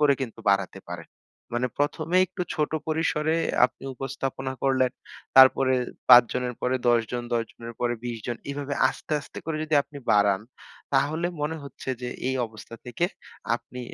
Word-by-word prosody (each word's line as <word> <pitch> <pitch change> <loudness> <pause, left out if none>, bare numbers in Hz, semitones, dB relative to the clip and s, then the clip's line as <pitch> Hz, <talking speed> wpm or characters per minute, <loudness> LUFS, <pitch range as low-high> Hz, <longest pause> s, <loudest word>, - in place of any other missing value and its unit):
করে 145 -2 +5
কিন্তু 125 -4 -5
বাড়াতে 100 -1 0
পারেন। - - -7 0.5
মানে 125 +1 +1
প্রথমেই 165 +5 +2
একটু 180 +1 -4
ছোট 150 -1 0 0.2
পরিসরে 155 0 +1 0.3
আপনি 130 - -16
উপস্থাপনা 135 0 -4
করলেন। 130 -2 +2 0.4
তারপরে 130 0 +7 0.3
৫ 125 -1 +10
জনের 125 -1 -2
পরে 125 +1 +1
১০ 120 -1 +5
জন, 120 -1 -2
১০ 115 - +1
জনের 115 0 -9
পরে 120 0 +1
২০ 120 -2 -3
জন। 120 -1 -2
এভাবে 140 0 -3
আস্তে, - - -6
আস্তে 140 - -10
করে 160 -1 -2
যদি 155 -1 0
আপনি 145 0 -11
বাড়ান, 100 -1 +4 0.5
তাহলে 150 +5 +2
মনে 155 +2 -1
হচ্ছে 140 - -10
যে 125 - -2 0.2
এই 130 - 0
অবস্থা 110 +1 -11
থেকে 145 +8 -1 0.5
আপনি 125 +1 -10
130 Hz, 165 wpm, -26 LUFS, 120-150 Hz, 0.5 s, ৫